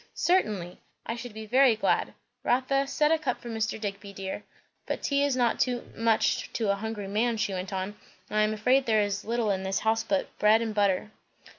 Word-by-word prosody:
"Certainly! 210 Hz, -, 0 dB, 0.3 s
I 230 Hz, -, -3 dB
should 240 Hz, -2 st, -8 dB
be 220 Hz, 0 st, -6 dB
very 250 Hz, +1 st, +5 dB
glad. 220 Hz, -, 0 dB, 0.3 s
Rotha, 275 Hz, +2 st, +1 dB
set 300 Hz, +3 st, +2 dB
a 325 Hz, -, +3 dB
cup 270 Hz, -5 st, -2 dB
for 240 Hz, -, -9 dB
Mr. 220 Hz, 0 st, -2 dB
Digby, 200 Hz, -1 st, -5 dB
dear. 195 Hz, +1 st, -5 dB, 0.4 s
But -, -, -3 dB
tea 280 Hz, 0 st, +2 dB
is 285 Hz, -2 st, +1 dB
not 240 Hz, -2 st, +2 dB, 0.3 s
much 225 Hz, -1 st, +1 dB
to 220 Hz, -4 st, +1 dB
a -, -, +1 dB
hungry 210 Hz, -1 st, -5 dB
man," 225 Hz, +3 st, 0 dB
she 205 Hz, -2 st, -1 dB
went 185 Hz, +1 st, -4 dB
on; 190 Hz, +1 st, -3 dB, 0.3 s
"and 215 Hz, -, -1 dB
I -, -, +5 dB
am 215 Hz, 0 st, +2 dB
afraid 255 Hz, +5 st, +2 dB
there 215 Hz, -2 st, +4 dB
is 200 Hz, -1 st, -3 dB
little 230 Hz, -1 st, 0 dB
in 190 Hz, -1 st, -1 dB
the 190 Hz, 0 st, -1 dB
house 220 Hz, 0 st, +2 dB
but 195 Hz, -1 st, -1 dB
bread 215 Hz, +1 st, +5 dB
and 225 Hz, -1 st, -2 dB
butter." 205 Hz, 0 st, +1 dB
220 Hz, 205 wpm, -28 LUFS, 200-245 Hz, 0.4 s, very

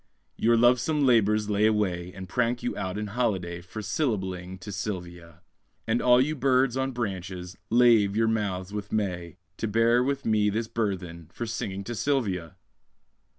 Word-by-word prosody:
Your 115 Hz, +1 st, +3 dB
lovesome 125 Hz, +5 st, +3 dB
labours 110 Hz, -4 st, +3 dB
lay 105 Hz, +1 st, +3 dB
away, 90 Hz, -5 st, 0 dB
And 95 Hz, -1 st, -7 dB
prank 120 Hz, +1 st, 0 dB
you -, -, -2 dB
out 95 Hz, +1 st, -3 dB
in 105 Hz, -, -2 dB
holiday, 95 Hz, -6 st, -2 dB
For 95 Hz, +5 st, -8 dB
syllabling 95 Hz, -, -2 dB
to 105 Hz, -, -7 dB
Sylvia; 90 Hz, -5 st, -6 dB, 0.4 s
And 115 Hz, +2 st, +1 dB
all 125 Hz, 0 st, +5 dB
you 150 Hz, +4 st, +1 dB
birds 130 Hz, -2 st, +2 dB
on 135 Hz, 0 st, -1 dB
branches, 95 Hz, -6 st, -5 dB
lave 115 Hz, -4 st, +5 dB
your 115 Hz, +1 st, +2 dB
mouths 100 Hz, -4 st, -2 dB
with 105 Hz, -1 st, -5 dB
May, 90 Hz, -5 st, -2 dB, 0.2 s
To 115 Hz, -, -2 dB
bear 115 Hz, +3 st, +3 dB
with 140 Hz, +1 st, -2 dB
me 105 Hz, -2 st, +3 dB
this 110 Hz, +2 st, -2 dB
burthen 90 Hz, -8 st, -3 dB
For 120 Hz, -, -5 dB
singing 100 Hz, -4 st, -4 dB
to 120 Hz, -, -5 dB
Sylvia! 100 Hz, -, -1 dB
105 Hz, 160 wpm, -27 LUFS, 95-120 Hz, 0.4 s, all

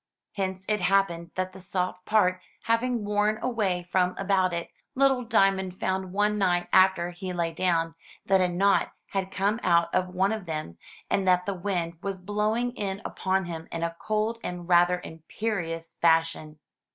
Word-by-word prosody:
Hence 190 Hz, -1 st, -3 dB
it 210 Hz, -2 st, 0 dB
happened 180 Hz, -3 st, +1 dB
that 185 Hz, 0 st, -2 dB
the 190 Hz, -, -11 dB
soft 180 Hz, 0 st, -3 dB
part 185 Hz, -4 st, +2 dB, 0.2 s
having 230 Hz, -1 st, 0 dB
worn 210 Hz, +1 st, +1 dB
away 200 Hz, -8 st, -1 dB
from 180 Hz, 0 st, +1 dB
about 190 Hz, -2 st, +2 dB
it, 170 Hz, -1 st, -4 dB, 0.2 s
little 270 Hz, -1 st, +3 dB
Diamond 195 Hz, -5 st, +2 dB
found 190 Hz, -1 st, -1 dB
one 210 Hz, +2 st, +1 dB
night, 175 Hz, -2 st, +2 dB
after 185 Hz, -2 st, +4 dB
he 185 Hz, +1 st, -6 dB
lay 170 Hz, -2 st, -1 dB
down, 165 Hz, -1 st, 0 dB, 0.3 s
that 190 Hz, -1 st, +4 dB
a 180 Hz, -, +3 dB
knot 195 Hz, +3 st, +2 dB, 0.2 s
had 190 Hz, -1 st, -1 dB
come 200 Hz, +3 st, 0 dB
out 170 Hz, -1 st, +2 dB
of 185 Hz, -, +2 dB
one 185 Hz, +2 st, +1 dB
of 215 Hz, -5 st, -4 dB
them, 155 Hz, -, -5 dB, 0.3 s
and 195 Hz, -1 st, 0 dB
that 180 Hz, 0 st, +4 dB
the 200 Hz, -, -1 dB
wind 175 Hz, -3 st, -3 dB
was 195 Hz, -1 st, -4 dB
blowing 210 Hz, +5 st, 0 dB
in 200 Hz, -4 st, -4 dB
upon 190 Hz, 0 st, -1 dB
him 165 Hz, -1 st, -6 dB
in 165 Hz, 0 st, -3 dB
a 165 Hz, 0 st, -2 dB
cold 215 Hz, +2 st, -1 dB
and 175 Hz, -1 st, -5 dB
rather 175 Hz, 0 st, +4 dB
imperious 165 Hz, -1 st, -4 dB
fashion. 160 Hz, -2 st, +2 dB
185 Hz, 170 wpm, -27 LUFS, 175-205 Hz, 0.3 s, after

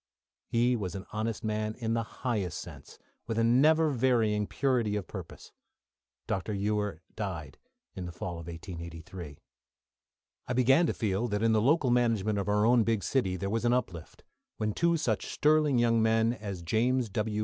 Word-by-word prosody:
He 120 Hz, +2 st, +2 dB
was 95 Hz, -6 st, -4 dB
an 95 Hz, -, -6 dB
honest 110 Hz, +1 st, -2 dB
man 110 Hz, 0 st, -2 dB
in 115 Hz, -2 st, -2 dB
the 115 Hz, -, +1 dB
highest 105 Hz, -6 st, -3 dB
sense, 75 Hz, -7 st, -11 dB, 0.3 s
with 115 Hz, -1 st, -2 dB
a 115 Hz, -, +3 dB
never 150 Hz, +7 st, +4 dB
varying 115 Hz, -5 st, +2 dB
purity 125 Hz, -6 st, 0 dB
of 100 Hz, -3 st, -2 dB
purpose. -, -, -9 dB, 0.7 s
Dr. 95 Hz, +3 st, -2 dB
Ewer 105 Hz, -3 st, -1 dB
died 90 Hz, -9 st, -5 dB, 0.3 s
in 90 Hz, -2 st, -6 dB
the -, -, -6 dB
fall 85 Hz, 0 st, -5 dB
of 85 Hz, -, -10 dB
1883. 85 Hz, -2 st, -8 dB, 1.1 s
I 125 Hz, -, -1 dB
began 135 Hz, +7 st, +4 dB
to -, -, 0 dB
feel 105 Hz, +1 st, 0 dB
that 105 Hz, -1 st, -1 dB
in 115 Hz, -, +4 dB
the 110 Hz, -1 st, +3 dB
local 135 Hz, +1 st, +3 dB
management 110 Hz, -4 st, +2 dB
of 100 Hz, -, -2 dB
our 105 Hz, +1 st, +3 dB
own 120 Hz, 0 st, +5 dB
big 110 Hz, -2 st, 0 dB
city 100 Hz, -9 st, 0 dB
there 100 Hz, -, -3 dB
was 115 Hz, +1 st, -1 dB
an 120 Hz, 0 st, +3 dB
uplift, 95 Hz, -10 st, -3 dB, 0.3 s
when 105 Hz, -1 st, -1 dB
two 170 Hz, +5 st, +2 dB
such 115 Hz, -10 st, -1 dB
sterling 150 Hz, -3 st, +3 dB
young 115 Hz, -1 st, +3 dB
men 110 Hz, +1 st, +3 dB
as 100 Hz, -7 st, -6 dB
James 120 Hz, +7 st, +1 dB
W. 105 Hz, +2 st, -2 dB
110 Hz, 175 wpm, -29 LUFS, 95-120 Hz, 1.1 s, own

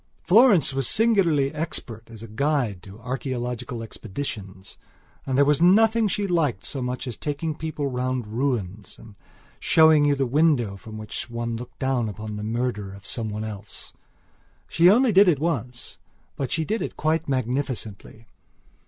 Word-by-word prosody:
Florence 200 Hz, -, +5 dB
was 135 Hz, -2 st, 0 dB
singularly 180 Hz, -11 st, +2 dB
expert 125 Hz, -8 st, -5 dB
as 115 Hz, -1 st, -11 dB
a -, -, -8 dB
guide 120 Hz, -, -1 dB
to 100 Hz, +3 st, -13 dB
archaeological 125 Hz, -1 st, -4 dB
expeditions 100 Hz, -4 st, -7 dB, 0.5 s
and 130 Hz, -1 st, 0 dB
there 140 Hz, -, +5 dB
was 150 Hz, +1 st, +2 dB
nothing 220 Hz, +5 st, +5 dB
she 205 Hz, +1 st, -1 dB
liked 160 Hz, -, 0 dB
so 135 Hz, -, -4 dB
much 125 Hz, +1 st, -3 dB
as 125 Hz, -4 st, -5 dB
taking 150 Hz, +2 st, -3 dB
people 155 Hz, -1 st, -4 dB
round 130 Hz, -2 st, -2 dB
ruins 110 Hz, -5 st, -3 dB
and 110 Hz, -, -14 dB, 0.5 s
showing 160 Hz, -2 st, +5 dB
you 145 Hz, -1 st, +3 dB
the 135 Hz, -1 st, 0 dB
window 130 Hz, -6 st, +2 dB
from 110 Hz, +2 st, -10 dB
which 110 Hz, +2 st, -5 dB
some 120 Hz, -, -12 dB
one 115 Hz, 0 st, -2 dB
looked 120 Hz, +2 st, -9 dB
down 130 Hz, -4 st, 0 dB
upon 105 Hz, +1 st, -7 dB
the 105 Hz, -, -5 dB
murder 110 Hz, -2 st, -2 dB
of 100 Hz, -1 st, -15 dB
some 115 Hz, +1 st, -2 dB
one 105 Hz, +1 st, -4 dB
else. 105 Hz, -1 st, -9 dB, 0.7 s
She 170 Hz, +2 st, +5 dB
only 240 Hz, +4 st, +5 dB
did 200 Hz, 0 st, +6 dB
it 165 Hz, -5 st, +4 dB
once; 125 Hz, -6 st, -4 dB, 0.4 s
but 135 Hz, -, -4 dB
she 160 Hz, -1 st, 0 dB
did 220 Hz, +5 st, -2 dB
it -, -, -5 dB
quite 155 Hz, 0 st, 0 dB
magnificently. 125 Hz, -4 st, -3 dB
130 Hz, 165 wpm, -24 LUFS, 110-155 Hz, 0.7 s, did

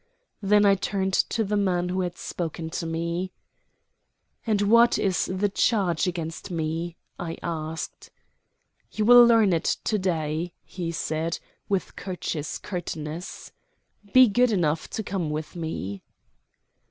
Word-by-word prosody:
Then 205 Hz, +1 st, +4 dB
I 200 Hz, -, +6 dB
turned 190 Hz, 0 st, -1 dB
to 225 Hz, +4 st, +1 dB
the 210 Hz, 0 st, -1 dB
man 180 Hz, -3 st, +1 dB
who 185 Hz, +1 st, 0 dB
had 175 Hz, -1 st, -3 dB
spoken 165 Hz, -1 st, -4 dB
to 165 Hz, -1 st, -3 dB
me. 170 Hz, +3 st, -2 dB, 1.1 s
"And 210 Hz, -2 st, +2 dB
what 235 Hz, +3 st, +5 dB
is 190 Hz, -3 st, +1 dB
the 190 Hz, +2 st, +1 dB
charge 195 Hz, -4 st, +1 dB
against 170 Hz, +1 st, -4 dB
me?" 165 Hz, 0 st, -3 dB, 0.2 s
I 165 Hz, -1 st, -4 dB
asked. 160 Hz, -1 st, -5 dB, 0.8 s
"You 215 Hz, -, -1 dB
will 245 Hz, +1 st, +9 dB
learn 225 Hz, -5 st, +5 dB
it 165 Hz, -, +1 dB
to 215 Hz, -, 0 dB
day," 165 Hz, -2 st, -1 dB
he 175 Hz, -3 st, -5 dB
said, 160 Hz, +1 st, -2 dB, 0.3 s
with 195 Hz, -2 st, -1 dB
courteous 170 Hz, -5 st, -4 dB
curtness. 165 Hz, -2 st, -6 dB, 0.6 s
"Be 255 Hz, -1 st, +8 dB
good 245 Hz, +3 st, +3 dB
enough 165 Hz, -6 st, 0 dB
to 220 Hz, -, -4 dB
come 185 Hz, -5 st, -2 dB
with 155 Hz, +3 st, -4 dB
me." 100 Hz, -, -4 dB
180 Hz, 135 wpm, -26 LUFS, 165-200 Hz, 1.1 s, will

